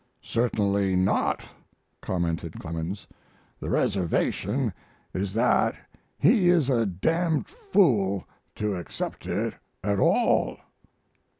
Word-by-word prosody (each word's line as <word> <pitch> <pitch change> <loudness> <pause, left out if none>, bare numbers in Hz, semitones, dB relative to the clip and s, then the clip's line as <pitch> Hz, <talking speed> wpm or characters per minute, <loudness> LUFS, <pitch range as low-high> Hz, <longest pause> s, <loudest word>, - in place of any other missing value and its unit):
"Certainly 100 -5 +1
not," 95 +1 +1 0.6
commented 85 -2 -2
Clemens; 85 +5 -5 0.5
"the - - -5
reservation 95 -4 0 0.4
is 95 +1 -2
that 115 +3 +3 0.4
he 185 - +4
is 160 -7 +4
a 115 -4 +2
d 95 -1 -3
d 165 -2 +1 0.3
fool 100 - +3 0.3
to 105 -1 -1
accept 90 -5 -5
it - - -1 0.3
at 100 0 +1
all." - - +3
100 Hz, 100 wpm, -26 LUFS, 95-125 Hz, 0.6 s, he